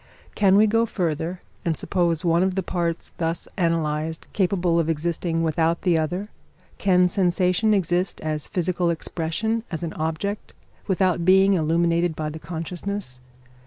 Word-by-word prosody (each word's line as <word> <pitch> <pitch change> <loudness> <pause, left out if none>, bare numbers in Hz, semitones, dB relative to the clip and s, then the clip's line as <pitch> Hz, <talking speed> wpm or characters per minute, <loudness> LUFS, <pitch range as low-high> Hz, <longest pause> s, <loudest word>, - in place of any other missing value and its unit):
Can 195 -2 +4
we 210 +2 +6
go 225 +2 +2
further, 170 -1 -2 0.2
and 165 -3 0
suppose 170 -2 0
one 170 0 +3
of 190 0 +1
the 190 - 0
parts 170 -2 -2
thus 165 0 -1
analysed 160 -3 -1
capable 180 -3 +1
of 165 -1 0
existing 165 +1 -1
without 165 +1 +1
the 180 -3 +3
other? 175 +6 -1 0.5
Can 180 -2 +4
sensation 180 +3 +2
exist 180 -2 +1
as 155 -1 -3
physical 180 -1 0
expression, 170 +7 -2
as 170 -1 -4
an 165 - -3
object; 160 +6 -3 0.3
without 185 -2 +1
being 190 +2 +5
illuminated 170 0 +1
by 155 -1 -3
the 160 - -7
consciousness? 170 -1 -5
170 Hz, 145 wpm, -24 LUFS, 160-185 Hz, 0.5 s, we